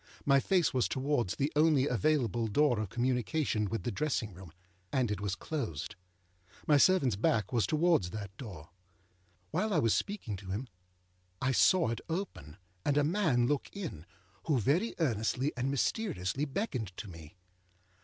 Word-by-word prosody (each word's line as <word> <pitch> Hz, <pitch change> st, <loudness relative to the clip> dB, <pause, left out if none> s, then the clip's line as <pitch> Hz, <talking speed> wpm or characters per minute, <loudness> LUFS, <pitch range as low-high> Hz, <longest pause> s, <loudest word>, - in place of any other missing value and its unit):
My 140 Hz, -1 st, +5 dB
face 180 Hz, +2 st, +2 dB
was 130 Hz, -2 st, +2 dB
towards 130 Hz, -7 st, 0 dB
the 140 Hz, +2 st, -1 dB
only 150 Hz, -3 st, +4 dB
available 120 Hz, -2 st, +1 dB
door 120 Hz, +2 st, +2 dB
of 105 Hz, -3 st, -3 dB
communication 125 Hz, -, 0 dB
with 115 Hz, -, -3 dB
the 120 Hz, -, -2 dB
dressing 120 Hz, -3 st, -1 dB
room, 90 Hz, -2 st, -12 dB, 0.4 s
and 125 Hz, -5 st, +1 dB
it 105 Hz, -, -3 dB
was 100 Hz, -2 st, -1 dB
closed. 115 Hz, -, -4 dB, 0.7 s
My 150 Hz, -, +5 dB
servantâs 135 Hz, -, +3 dB
back 110 Hz, 0 st, +1 dB
was 115 Hz, -6 st, +2 dB
towards 155 Hz, -, +2 dB
that 100 Hz, -1 st, -7 dB
door. 95 Hz, -, -9 dB, 0.8 s
While 215 Hz, 0 st, 0 dB
I 185 Hz, -, +2 dB
was 115 Hz, -8 st, +3 dB
speaking 190 Hz, -, -2 dB
to 95 Hz, -1 st, -10 dB
him, 110 Hz, +8 st, -3 dB, 0.7 s
I 130 Hz, -, +1 dB
saw 170 Hz, +2 st, +4 dB
it 115 Hz, -, -3 dB
open, 160 Hz, -, -5 dB, 0.3 s
and 145 Hz, 0 st, +1 dB
a 145 Hz, -, +4 dB
man 155 Hz, -7 st, +2 dB
look 145 Hz, +2 st, 0 dB
in, 155 Hz, -, -6 dB, 0.4 s
who 150 Hz, -5 st, +2 dB
very 150 Hz, -, +1 dB
earnestly 130 Hz, -, 0 dB
and 130 Hz, +1 st, -1 dB
mysteriously 140 Hz, -, -1 dB
beckoned 130 Hz, -, -3 dB
to 105 Hz, -, -6 dB
me. 80 Hz, -4 st, -11 dB
130 Hz, 160 wpm, -32 LUFS, 105-150 Hz, 0.8 s, My